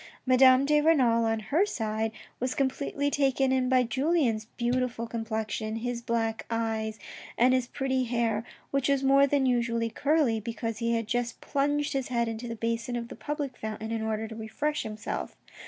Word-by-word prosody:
Madame 255 +1 +6
de 300 +1 +4
Renal, 250 -8 +4
on 225 0 +1
her 280 - +1
side, 220 - -2 0.3
was 255 +1 -1
completely 280 +1 -1
taken 270 -2 +2
in 260 -1 +2
by 255 -1 +4
Julien's 260 -3 +1
beautiful 245 -1 0
complexion, 220 -1 -3
his 240 +1 -3
big - - -31
black 225 -1 -1
eyes, 220 -1 -2 0.4
and 250 +2 +5
his 255 -2 +1
pretty 265 -1 -1
hair, 230 -2 0 0.3
which 275 0 +1
was 275 -1 +2
more 275 +1 +5
than 280 -1 +2
usually 235 -2 +1
curly, 285 -6 +2
because 225 0 -4
he 230 0 +1
had 230 -1 -1
just 240 +1 -2
plunged 290 +1 0
his 270 -2 -1
head 235 -2 0
into 225 +1 -4
the 230 - -4
basin 230 +2 -2
of 235 -1 -4
the - - -8
public 290 -3 -4
fountain 220 0 -5
in 225 -1 -1
order 220 0 -2
to 220 - -8
refresh 260 +8 -2
himself. 215 0 -5
240 Hz, 180 wpm, -28 LUFS, 225-270 Hz, 0.4 s, Madame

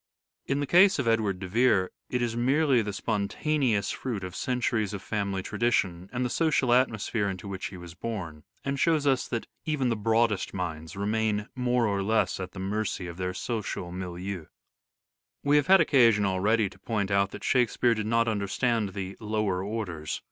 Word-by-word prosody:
In 140 +1 0
the - - 0
case 185 +7 +6
of 140 -5 -1
Edward 110 -4 +2
de 95 0 -6
Vere 95 -2 +3 0.2
it 125 -1 0
is 115 -1 -1
merely 135 +1 +3
the 105 -1 -3
spontaneous 110 +2 0
fruit 115 -7 -4
of 90 0 -6
centuries 115 -5 -1
of 100 - -7
family 100 -3 -2
tradition 100 -5 0
and 125 0 -1
the - - -1
social 155 -5 +2
atmo 120 -3 +3
sphere 100 0 -1
into 95 0 -6
which 95 -1 -4
he 95 - -9
was 85 -1 -10
born, 85 -8 -6 0.2
and 140 0 -1
shows 160 -2 +2
us 135 -3 +2
that 115 -2 -3 0.2
even 150 -5 0
the 115 - +1
broadest 110 -2 +1
minds 80 -3 -4
remain 105 +1 -1
more 125 -1 +1
or 100 -2 0
less 100 -2 +1
at 90 -1 -6
the 95 - -8
mercy 95 -1 -2
of 85 0 -7
their 90 0 -3
social 105 -6 -3
milieu. 90 -1 -5 1.0
We 145 +1 +4
have 145 0 +2
had 195 0 +7
occasion 115 -9 +5
already 100 +3 +2
to - - -17
point 105 -4 -2
out 100 0 +3
that - - -9
Shakespeare 120 -1 +2
did 110 -1 -3
not 115 +1 +2
understand 105 0 0
the 95 -1 -4
"lower 105 -4 -1
orders." 95 -8 -4
110 Hz, 185 wpm, -28 LUFS, 95-120 Hz, 1.0 s, had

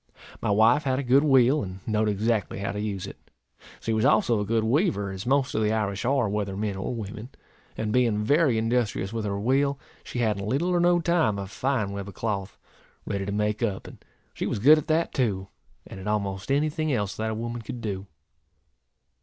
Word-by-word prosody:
My - - -1
wife 115 +8 +4
had 130 -1 +1
a 140 - -1
good 135 +3 +4
wheel, 135 0 +4
and 95 -3 -6
knowed 110 -1 +1
exactly 105 0 0
how 100 0 -2
to 105 - -4
use 100 -3 -3
it. - - -10 0.6
She 115 - -2
was 110 0 +1
also 115 -3 +3
a 105 - -1
good 115 +1 +1
weaver, 115 - +1
as 95 +3 -6
most 135 0 +2
of 110 - 0
the 105 0 +2
Irish 105 0 -1
are, 135 -3 +2
whether 100 -1 -2
men 105 -1 -2
or 95 +5 -3
women; 110 +2 -7 0.5
and 105 -1 -2
being 115 -4 +2
very 145 0 +3
industrious 110 -3 0
with 110 -2 -2
her 100 -1 -2
wheel, 135 +5 +1 0.3
she - - -7
had, 110 -4 +1
in 100 - -4
little 140 +10 0
or 175 -1 +2
no 175 0 +4
time, 165 -12 +2
a 100 - -4
fine 110 0 -1
web 100 0 -5
of 100 - -10
cloth, 100 -4 -3 0.5
ready 100 -1 -3
to - - -2
make 105 +1 -1
up; 100 -5 -1
and - - -12 0.3
she - - -3
was - - -1
good 150 +9 +7
at 150 - -8
that 160 +1 +1
too, 100 -7 -1 0.4
and 95 - -10
at 95 - -7
almost 100 +1 -2
any 150 +2 +2
thing 155 -1 -1
else 100 -6 -1
that 110 0 -2
a 110 - -2
woman 115 +1 -4
could 120 +2 -7
do. 100 -3 -4
110 Hz, 220 wpm, -26 LUFS, 100-130 Hz, 0.6 s, good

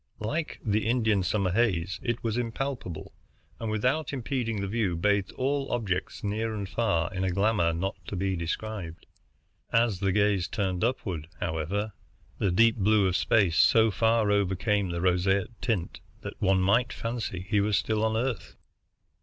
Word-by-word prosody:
Like 150 +9 -3
the 110 0 +1
Indian 110 -4 +2
summer 95 0 0
haze, 95 -4 +1
it 120 -1 -2
was 115 -2 -1
impalpable, 120 - -4 0.5
and 115 - -3
without 125 +8 0
impeding 125 -4 -2
the 100 - -2
view 100 -4 0
bathed 100 +3 +1
all 135 +1 -1
objects 100 -7 -2
near 110 +2 -1
and 100 -2 -4
far 95 -4 0
in 95 0 -2
a 95 - +1
glamour 100 -2 +2
not 95 +5 -3
to - - -4
be 95 +1 -1
described. 85 0 -5 0.7
As 115 -5 +2
the 95 0 +1
gaze 100 -2 +2
turned 95 -3 -2
upward, 95 - -2
however, 90 +7 -2 0.5
the 100 - +2
deep 115 +5 +4
blue 105 0 +3
of 90 - 0
space 95 -6 +2
so 110 -1 +5
far 110 0 +2
overcame 100 0 +1
the 85 0 -3
roseate 95 +3 +1
tint 105 -8 -2 0.2
that - - -8
one 95 -1 +3
might 115 +6 +3
fancy 115 -6 -4
he 105 -1 +2
were 105 +1 0
still 110 +1 +1
on 110 0 +1
Earth. 120 -2 -3
105 Hz, 160 wpm, -28 LUFS, 95-115 Hz, 0.7 s, so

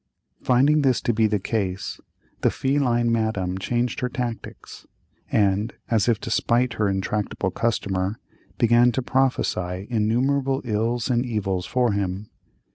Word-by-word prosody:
Finding 140 +5 +3
this 130 -3 +2
to 120 - 0
be 110 0 +3
the 105 0 +1
case, 100 -2 -3 0.4
the - - +4
feline 125 -4 +1
Madame 100 -5 -1
changed 120 +5 -1
her 125 - -1
tactics, 120 -3 -6 0.4
and, 105 +2 +1 0.2
as 115 0 +3
if 115 -2 +2
to 120 - -5
spite 120 +2 +2
her 105 -3 0
intractable 95 0 -2
customer, 100 -2 -1 0.4
began 120 +1 +4
to 130 - -1
prophesy 95 -9 0
innumerable 130 +5 +1
ills 115 +2 -1
and 120 0 +2
evils 100 -7 -2
for 125 -3 +1
him. 100 0 -3
115 Hz, 135 wpm, -24 LUFS, 100-125 Hz, 0.4 s, the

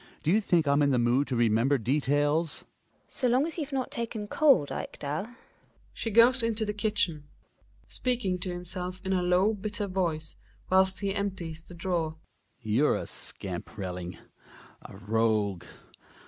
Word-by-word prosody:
Do 155 - +2
you 215 +4 +4
think 170 -6 +2
I 140 - +4
am 145 - +3
in 145 - +4
the 130 - +3
mood 120 +4 +2
to 130 - -2
remember 120 +4 +3
details? 145 +5 +1
GiNA. - - -32
So 255 - 0
long 255 +4 +3
as 330 +1 -5
you've 295 -2 -4
not 265 -2 -2
taken 230 -3 -4
cold, 270 - +4
Ekdal 150 +8 -4 0.7
She 225 - -3
goes 235 +4 +6
into 225 -1 0
the 210 - -2
kitchen. 195 -8 -1
Hjalmar - - -33
{speaking 230 -8 -1
to 185 - -3
himself 180 +1 -5
in 190 - 0
a 185 - +2
low 180 +4 +3
hitter 210 0 -2
voice 170 -5 -2 0.4
whilst 190 +1 +3
he 200 -1 0
empties 185 -6 -3
the 175 - -13
drawer). 165 -2 -1 0.5
You're 115 +7 +3
a - - -3
scamp, - - -5
Relling! 90 -3 -5 0.6
A - - -11
rogue 105 -3 0
175 Hz, 165 wpm, -28 LUFS, 140-210 Hz, 0.7 s, goes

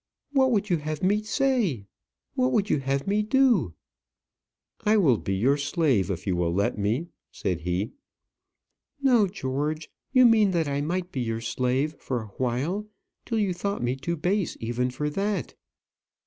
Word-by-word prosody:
"What 265 -2 +3
would 210 -3 +1
you 175 - +4
have 155 +1 -5
me 205 +3 +3
say? 215 - 0 0.5
what 130 0 +1
would 205 +8 +1
you - - +2
have 135 +1 -1
me 205 +2 +1
do?" 225 - +3 1.1
"I 215 +1 +4
will 135 - +4
be 95 - -2
your 130 +9 +2
slave 140 - +1
if 90 -2 -4
you 95 - 0
will 85 -1 0
let 100 +4 +1
me," 110 +11 -1 0.2
said 90 -3 -2
he. 90 +5 -2 1.1
"No, 245 -7 +4
George 150 -2 -3 0.2
you 255 -1 +6
mean 220 -3 +5
that 165 -3 +1
I 140 0 -1
might 180 +4 -2
be 130 - -2
your 115 -1 -2
slave 125 +5 0
for 125 -4 -3
awhile, 130 - -2 0.4
till 230 - -1
you 200 -4 +1
thought 200 0 -3
me 120 +2 0
too 140 +6 -3
base 185 +4 0
even 120 +2 -1
for 140 +4 -3
that." 195 - -2
150 Hz, 165 wpm, -26 LUFS, 125-205 Hz, 1.1 s, you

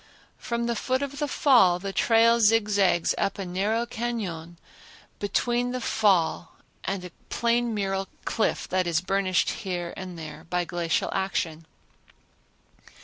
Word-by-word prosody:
From 235 0 -2
the 235 0 -1
foot 260 +4 -1
of 280 0 -5
the 295 - 0
Fall 240 - +4
the 195 +2 -5
trail 230 +2 +4
zigzags 205 -5 +3
up 195 - 0
a 195 - -4
narrow 205 +6 0
cañon 205 -9 -4 0.6
between 240 +4 0
the 255 - -2
fall 190 -8 +1 0.3
and 190 -1 -3
a 180 - -9 0.2
plain 235 0 +1
mural 195 -1 -1 0.2
cliff 225 - 0
that 185 -1 +1
is 165 -2 +2
burnished 185 0 +1
here 175 -2 -4
and 185 -2 -7
there 155 -1 -9
by 180 -1 0
glacial 170 -1 -1
action. 165 -4 -2
195 Hz, 140 wpm, -26 LUFS, 180-235 Hz, 0.6 s, Fall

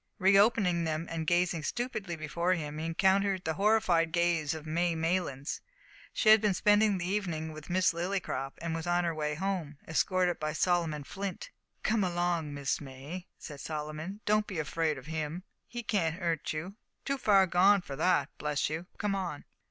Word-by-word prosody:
Re 195 -1 +4
opening 200 -5 +4
them, 160 0 -1
and 160 -1 -3
gazing 175 -1 +2
stupidly 215 - -3
before 170 +3 0
him, 150 -2 -5
he 160 - -3
encountered 190 +2 +2
the 160 - -1
horrified 190 -5 +3
gaze 170 -3 +1
of 160 -1 -8
May 170 +2 0
Maylands! 160 -4 -1 0.5
She 215 - +2
had 215 -1 +8
been 210 -3 +2
spending 205 0 +4
the 175 - -3
evening 175 -5 -2
with 155 +1 -10
Miss 180 0 +3
Lillycrop, 170 -6 -2
and 165 -1 -2
was 165 +1 -4
on 175 0 +2
her 170 -1 0
way 150 -1 -2
home, 175 -4 -3
escorted 180 +2 +1
by 155 0 -2
Solomon 165 -3 +1
Flint. 200 - -6 0.3
"Come 215 -1 +2
along, 175 -3 0
Miss 140 0 -2
May," 145 +6 -8
said 145 -3 -9
Solomon, 155 +7 -5
"don't 210 0 +2
be 190 - -5
afraid 155 0 0
of 130 - -11
'im. 160 +2 -3 0.2
He 240 -1 -6
can't 180 -6 0
'urt 170 -4 -1
you 175 +7 -5 0.3
too 275 0 -1
far 200 -5 +5
gone 190 +3 +5
for 140 - -6
that, 180 +5 +2
bless 150 0 -1
you. 165 +3 -4
Come 205 -1 -1
on." 180 -7 -4
175 Hz, 180 wpm, -30 LUFS, 155-195 Hz, 0.5 s, had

